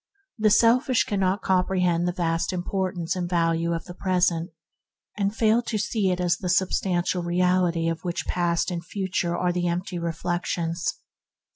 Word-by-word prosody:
The 215 0 +4
selfish 245 +4 +4
cannot 195 -3 0
comprehend 180 -2 +1
the - - +1
vast 165 -2 -1
importance 185 -1 -2
and 175 -1 -3
value 165 -1 +1
of 165 -1 -3
the 175 - -9
present, 180 -2 0 0.7
and 200 0 -1
fail 225 +1 +3
to 235 -2 -3
see 205 -1 0
it 180 0 -1
as 175 -1 +1
the 180 - -4
sub 185 +1 +3
stantial 180 -1 0
reality 175 -1 +1
of 165 0 -2
which 175 -1 -3
past 175 0 0
and 170 -1 -4
future 180 -2 -2
are 180 -1 0
the 175 0 -1
empty 175 +1 -2
reflections. 170 0 -2
180 Hz, 160 wpm, -25 LUFS, 170-190 Hz, 0.7 s, The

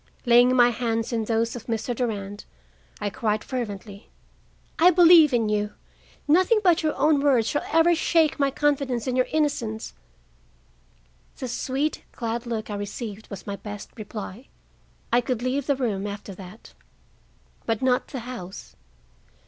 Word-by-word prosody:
Laying 245 +1 +5
my 245 -1 +6
hands 230 0 -2
in 225 -1 -1
those 230 +1 0
of 240 - -9
Mr. 230 +1 -2
Durand, 205 -4 -4 0.5
I 205 -1 -2
cried 215 -3 -1
fervently: 205 -5 -6 0.7
"I 345 +3 +7
believe 340 -3 +7
in 235 -3 +1
you. 210 0 -1 0.5
Nothing 370 +9 +4
but 355 -3 +4
your 310 -2 0
own 300 0 +3
words 260 -6 +3
shall 290 - -1
ever 325 +2 +5
shake 320 -2 +2
my 280 -1 +3
confidence 275 -4 0
in 255 -2 -1
your 255 0 +2
innocence." 240 -8 -1 1.4
The 255 - -5
sweet, 270 +5 -2
glad 235 0 -4
look 220 -2 -4
I - - -3
received 205 +1 -6
was 200 -3 -8
my 200 -1 -4
best 205 0 -8
reply. 215 +1 -8 0.7
I 240 - +5
could 245 -1 -3
leave 255 +2 -1
the 285 - +2
room, 210 -7 -2
after 200 -1 -7
that. 190 +4 -12 0.9
But 225 +1 -1
not 250 -1 +2
the 265 -4 -6
house. 225 -6 -9
240 Hz, 150 wpm, -25 LUFS, 215-275 Hz, 1.4 s, I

